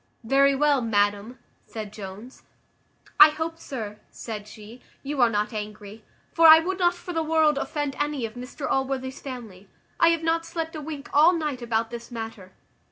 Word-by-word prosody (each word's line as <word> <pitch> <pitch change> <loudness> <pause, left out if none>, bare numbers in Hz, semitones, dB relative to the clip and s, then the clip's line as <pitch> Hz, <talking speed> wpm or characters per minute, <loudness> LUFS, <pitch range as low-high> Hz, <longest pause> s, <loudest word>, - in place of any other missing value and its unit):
"Very 275 +4 +3
well, 290 -1 +2
madam," 205 +1 0 0.3
said 215 -2 -7
Jones. 210 +4 -10 0.8
"I - - +11
hope, 320 +2 -5
sir," 215 -9 -7
said 210 -3 -7
she, 215 +3 -13 0.2
"you 280 -1 -2
are 240 - +5
not 210 +1 -1
angry; 210 0 -7 0.3
for 330 -1 +6
I 315 0 +11
would 365 +4 -2
not 350 -1 +3
for 355 0 -8
the 325 - 0
world 315 -2 +2
offend 290 -1 -3
any 290 -4 -1
of 220 - -7
Mr 250 +3 -7
Allworthy's 265 -1 -2
family. 220 -8 -9 0.3
I 335 - +6
have 330 -1 +2
not 330 0 +1
slept 330 -1 -5
a 305 - -5
wink 295 -1 -7
all 315 +5 +6
night 300 -6 -3
about 230 -1 -1
this 235 0 -8
matter." 225 -5 -8
260 Hz, 175 wpm, -25 LUFS, 220-310 Hz, 0.8 s, I